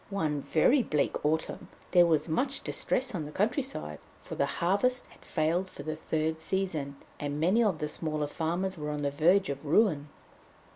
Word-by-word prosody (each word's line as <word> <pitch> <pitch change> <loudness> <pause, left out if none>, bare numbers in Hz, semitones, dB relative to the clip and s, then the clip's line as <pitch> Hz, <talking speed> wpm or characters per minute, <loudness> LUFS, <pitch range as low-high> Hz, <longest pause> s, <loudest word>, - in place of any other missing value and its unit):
One 155 -7 -1
very 245 - +3
bleak 150 -10 -1
autumn 155 +2 -1 0.2
there 175 -2 +6
was 160 -1 +2
much 265 - 0
distress 260 -1 -1
on 165 -6 -3
the 150 - -8
countryside, 210 - -2 0.2
for - - -8
the - - +1
harvest 205 +9 +1
had - - -20
failed 170 +4 0
for - - -9
the 155 +1 -3
third 160 0 -1
season, 160 -5 -2 0.2
and 145 0 -3
many 190 +9 +3
of 200 -7 +1
the 150 - -2
smaller 155 -1 -2
farmers 170 +4 -2
were 150 0 -3
on 150 -1 -3
the 140 - 0
verge 175 +6 +3
of 140 +1 -4
ruin. 155 -2 +2
160 Hz, 180 wpm, -29 LUFS, 150-195 Hz, 0.2 s, there